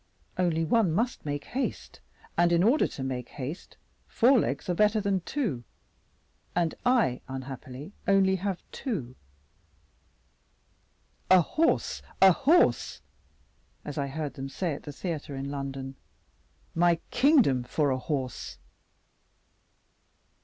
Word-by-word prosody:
Only 165 -3 +1
one 195 -1 +2
must 230 -3 -1
make 145 0 -2
haste, 265 +2 -4 0.4
and 175 0 +3
in 170 +1 +4
order 250 +9 +4
to 135 - -7
make 125 -2 -4
haste 145 +6 -7 0.3
four 250 +2 +4
legs - - -2
are 180 - +1
better 210 +4 +3
than 200 -2 0
two, 205 - -2 0.9
and 170 -2 +1
I, 240 - +2
unhappily, 130 +4 -7
only 195 -1 +4
have 190 -1 -3
two. 145 - -4 2.1
'A 185 -1 +8
horse, 315 - 0 0.2
a 190 0 +8
horse,' 305 - +2 0.8
as 145 0 -4
I 140 - -1
heard 145 0 -4
them 135 +1 -6
say 170 +3 -2
at 140 - -7
the 145 - -8
theatre 150 -2 -5
in 135 +1 -4
London, 135 -1 -5 0.8
'my 170 0 +3
kingdom 250 - +4
for 140 +3 0
a 130 - 0
horse! 130 -3 -4
165 Hz, 125 wpm, -28 LUFS, 135-200 Hz, 2.1 s, A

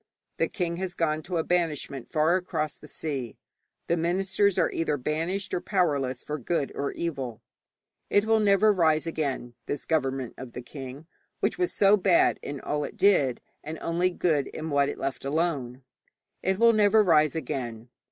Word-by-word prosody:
The - - +2
king 170 -3 -3
has 185 -1 -3
gone 155 -2 0
to 175 +2 -3
a 160 - +1
banishment 155 -7 -1
far 155 +3 +3
across 155 -5 -2
the 150 - -14
sea, 135 -7 -4 0.5
the 170 - +1
ministers 190 +3 +1
are 170 - +2
either 160 -3 0
banished 165 +8 -2
or 175 - 0
powerless 140 - 0
for 150 0 -4
good 140 +2 -1
or 140 - -2
evil. 130 -9 -4 0.7
It 205 +1 +3
will 220 0 +3
never 210 0 +4
rise 160 -4 +2
again, 140 -7 -3
this 145 - -3
government 135 -5 -1
of 130 -3 -8
the 125 - -6
king, 135 +3 -9 0.3
which - - -1
was 360 0 +1
so 200 +1 +5
bad 345 - +3
in 145 -1 -5
all 150 +2 -2
it 215 - -7
did, 180 - +3 0.2
and 155 +1 -6
only 175 +2 +1
good 160 -6 0
in 160 0 -6
what 140 0 +3
it - - -5
left 135 0 -3
alone. 140 -4 -1 0.6
It 190 +1 0
will 230 +2 +6
never 215 0 +5
rise 155 -4 +4
again. 120 -6 -4
160 Hz, 175 wpm, -27 LUFS, 140-185 Hz, 0.7 s, will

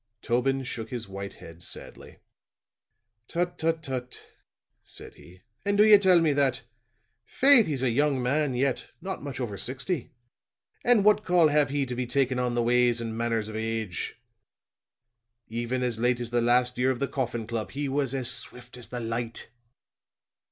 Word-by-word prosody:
Tobin 135 +3 +1
shook 115 -2 -6
his 120 -4 -5
white 100 0 -7
head 85 +1 -13
sadly. - - -10 1.1
"Tut, 175 +1 -1
tut, 165 0 0
tut," 130 -3 -5 0.5
said - - -8
he. 90 +1 -17 0.2
"And 200 0 +1
do 210 - +7
you 210 -2 +8
tell 185 -3 +5
me 155 -3 +3
that! 135 -2 +1 0.6
Faith, 265 - +5
he's 140 -4 -2
a 125 - +2
young 140 +2 +2
man 140 +1 +1
yet 130 +1 -1
not 190 0 -5
much 140 -3 -6
over 105 -6 -4
sixty 130 - -3 0.7
and 240 -5 +4
what 210 0 +5
call 175 -5 +4
have 145 -2 +3
he 140 0 0
to 125 - -5
be 125 0 -3
takin' 130 -1 +1
on 125 -1 0
the 120 - +1
ways 120 0 +3
and 115 -1 -4
manners 115 -2 -1
of 110 - -7
age? 110 -2 -3 1.3
Even 120 +3 -2
as 120 -3 -2
late 125 +1 +2
as 120 -1 -5
the 120 0 +2
last 125 +1 +2
year 130 +1 +3
of 130 - 0
the 140 - -1
Coffin 120 -5 -3
Club 110 -3 -3
he 140 +5 -3
was 135 -1 -1
as 130 -3 -1
swift 125 +1 -8
as 120 - -7
the 125 - -5
light." 115 0 -4
125 Hz, 175 wpm, -27 LUFS, 115-145 Hz, 1.3 s, you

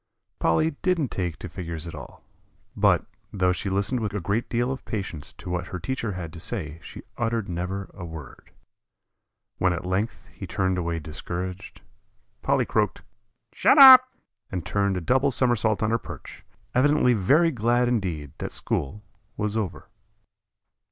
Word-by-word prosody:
Polly 155 - +2
didn't 175 -8 +1
take 90 -5 -3
to 90 - -7
figures 85 -2 -5
at 85 - -7
all; - - -10 0.5
but, - - +3 0.3
though 90 -2 +2
she 90 +2 -3
listened 100 +6 0
with 105 -2 -3
a - - 0
great 100 +6 -1
deal 120 +2 0
of 135 - -5
patience 95 -9 -5
to - - -13
what 90 0 -2
her 90 - -5
teacher 115 +1 -3
had 85 -3 -6
to 85 - -9
say 80 -6 -3
she - - -10 0.2
uttered 115 -3 -1
never 90 +3 -4
a 90 - -9
word. 80 -5 -10 1.1
When 90 -1 +3
at 85 - -5
length 95 +5 -2
he - - -8
turned 95 -2 0
away 85 -1 -2
discouraged, 90 +5 -6 0.6
Polly 135 -2 +2
croaked, 105 -5 0 0.5
"Shut - - +4
up," 260 -2 +11 0.4
and 90 -3 -4
turned 100 0 0
a - - -3
double 130 - +2
somersault 115 -4 +2
on 110 - +1
her 115 - +2
perch, - - -10 0.3
evidently 140 -1 +4
very 145 - +3
glad 120 0 +2
indeed 90 - -2
that - - -4
school 105 +10 -2 0.3
was 105 0 -1
over. 105 -5 -3
100 Hz, 160 wpm, -25 LUFS, 90-120 Hz, 1.1 s, up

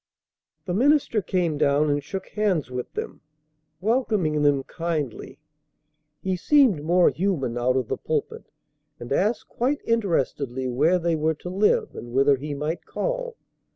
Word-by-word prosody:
The 180 - -2
minister 265 0 +3
came 175 -5 -1
down 145 +1 +3
and 145 0 -1
shook 190 +5 -6
hands 190 - 0
with 125 -1 -5
them, - - -6 0.6
welcoming 205 - +1
them 145 -2 +3
kindly. 155 -6 -4 0.9
He 190 -1 0
seemed 245 - +4
more 175 +3 +4
human 165 -10 -1
out 125 +2 +1
of 130 -3 -1
the - - -2
pulpit, - - -3 0.5
and 120 +3 -4
asked 210 +9 0
quite 270 +5 -1
interestedly 140 - 0
where 150 +9 +2
they 170 -1 0
were 155 +1 0
to 180 - -8
live 200 +3 +2
and 120 0 -8
whether 135 +2 +4
he 145 +2 -5
might 150 +4 -3
call. - - -3
165 Hz, 150 wpm, -24 LUFS, 140-205 Hz, 0.9 s, seemed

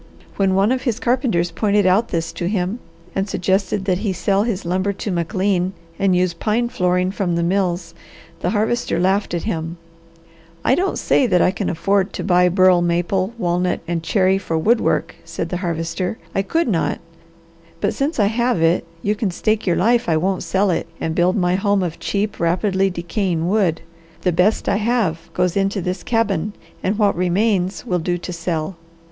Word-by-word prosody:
When 195 -1 +2
one 200 +4 +3
of 260 0 0
his 240 -4 -1
carpenters 235 -9 +1
pointed 205 +1 +1
out 195 +5 +3
this 165 -4 -3
to 175 - -3
him, 190 +3 -1 0.3
and 195 +1 -1
suggested 190 +1 0
that 185 -2 +1
he 205 -2 -1
sell 195 +2 +1
his 210 -5 -2
lumber 185 +3 0
to 200 +1 -4
McLean 185 +2 0 0.3
and 195 -2 +3
use 180 -1 +2
pine 225 +7 0
flooring 180 -5 +1
from 190 -4 -1
the 170 - 0
mills 175 -2 0 0.5
the 175 - -1
Harvester 220 0 0
laughed 190 0 +1
at 170 - -3
him. 165 -5 -3 0.9
"I - - +4
don't 370 +8 0
say 260 - +2
that 180 -5 +3
I 180 - +4
could 185 - -3
afford 195 +3 0
to - - -4
buy 180 -1 +4
burl 185 -1 +4
maple, 175 +4 0
walnut, 180 -2 0
and 170 -1 -1
cherry 190 +2 +2
for 165 -4 -2
wood 220 +8 +3
work," - - 0
said - - -5
the 180 - -2
Harvester. 170 +2 -2 0.2
"I 195 - +1
could 325 +11 0
not, 180 -8 0 0.8
but - - 0
since 280 0 -1
I 205 - +5
have 235 +1 +1
it, 165 +1 +2 0.2
you 205 - +2
can 210 -1 -1
stake 215 +4 -1
your 175 - +3
life 235 +4 +2
I 160 - +3
won't 185 +3 0
sell 195 0 +1
it 165 - -1
and 160 - -2
build 175 +2 +2
my 180 -3 +1
home 200 0 +1
of 170 -2 -4
cheap, 205 +1 -2
rapidly 190 +3 +1
decaying 175 -1 -2
wood. 185 -5 +1 0.4
The 180 - +2
best 180 +6 +2
I 200 - +2
have 210 -7 -1
goes 180 -1 +1
into 195 +1 +1
this 180 0 -3
cabin 210 -4 0 0.3
and 200 +3 0
what 205 -2 +3
remains 185 -1 0
will 180 -1 0
do 175 +2 -1
to 175 +1 -6
sell. 170 0 -3
185 Hz, 190 wpm, -20 LUFS, 175-205 Hz, 0.9 s, I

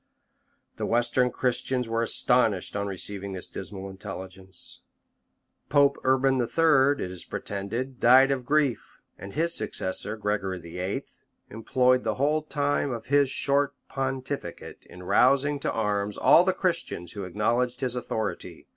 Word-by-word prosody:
The - - -2
western 120 +2 +2
Christians 125 0 0
were 115 0 -1
astonished 115 -5 +2
on 100 0 -1
receiving 100 0 -4
this 95 - -3
dismal 95 0 -7
intelligence. 95 -1 -8 0.9
Pope 140 -1 +4
Urban 130 0 +3
III., 145 - +3
it 90 - -7
is 90 - -8
pretended, 115 +6 -5
died 130 +3 +6
of 130 -2 -1
grief; 140 -2 0 0.2
and 100 - -9
his 165 +2 0
successor, 110 - -1
Gregory 105 -3 -2
VIII., 90 +3 -4 0.5
employed 125 +3 +2
the 110 -1 -1
whole 150 +5 +1
time 145 -1 -1
of 115 -3 -5
his 140 -2 +5
short 140 +1 +1
pontificate 135 -7 -5
in 90 +1 -11
rousing 140 +8 +3
to - - -1
arms 105 -2 -1
all 175 - +6
the 190 - +2
Christians 170 - -2
who 100 - -6
acknowledged 120 +7 -1
his 125 -2 -1
authority. 110 -3 -4
120 Hz, 140 wpm, -26 LUFS, 100-135 Hz, 0.9 s, died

